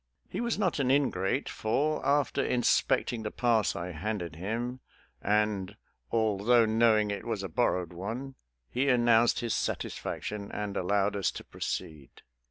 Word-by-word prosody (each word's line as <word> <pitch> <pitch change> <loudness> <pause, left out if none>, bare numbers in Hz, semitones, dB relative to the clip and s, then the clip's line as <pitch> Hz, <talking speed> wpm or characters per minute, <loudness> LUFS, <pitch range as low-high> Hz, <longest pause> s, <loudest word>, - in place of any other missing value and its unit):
He - - -3
was 235 -1 0
not 185 -7 0
an 130 -2 +1
ingrate, 135 -4 +1
for, 145 +8 0
after 140 -1 +2
inspecting 120 -1 +1
the 110 - -3
pass 115 -4 +1
I 90 +1 -4
handed 90 -1 -4
him, 115 +8 -3 0.4
and, 105 -1 0 0.3
although 110 +1 +3
knowing 110 -1 +3
it 100 -1 -4
was 110 -4 -3
a - - -2
borrowed 90 -7 0
one, 115 +10 -5 0.4
he 135 +2 +1
announced 120 -2 +4
his 120 -1 -1
satisfaction 105 -1 -3
and 105 -1 -4
allowed 100 +2 +1
us 100 -3 +1
to - - -7
proceed. 75 -5 -6
110 Hz, 145 wpm, -29 LUFS, 100-125 Hz, 0.4 s, announced